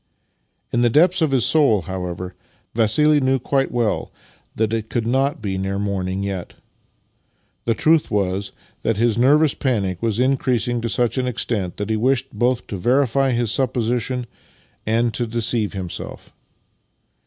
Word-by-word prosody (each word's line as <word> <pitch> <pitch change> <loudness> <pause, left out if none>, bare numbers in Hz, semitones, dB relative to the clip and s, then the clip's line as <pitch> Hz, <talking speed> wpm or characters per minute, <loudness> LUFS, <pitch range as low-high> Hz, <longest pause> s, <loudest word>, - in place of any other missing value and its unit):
In 120 - +2
the 120 - +4
depths 170 +8 +3
of 160 - +3
his 130 -4 +2
soul, 135 - +3
however, 90 0 -5 0.4
Vassili 130 +7 +3
knew 130 0 +2
quite 135 +1 0
well 120 -4 -1 0.4
that 110 0 0
it 110 -1 -2
could 120 -3 -1
not 135 +5 0
be 95 -2 -2
near 95 +1 -2
morning 100 -1 -2
yet. 95 -3 -5 1.1
The 115 - +1
truth 160 +5 +3
was 100 -1 -1 0.3
that 115 -2 0
his 115 0 +2
nervous 145 +4 +4
panic 100 -9 -1
was 115 -1 0
increasing 125 -2 +1
to 115 - -2
such 120 +3 0
an 125 - -1
extent 105 -6 -2
that 105 +1 -3
he 110 - +1
wished 130 +3 0
both 120 +3 0
to 100 - -5
verify 135 +5 +2
his 120 -3 +1
supposition 125 0 0 0.6
and 115 +1 +1
to 120 +3 -1
deceive 115 -1 0
himself. 95 -3 -6
115 Hz, 155 wpm, -21 LUFS, 105-130 Hz, 1.1 s, the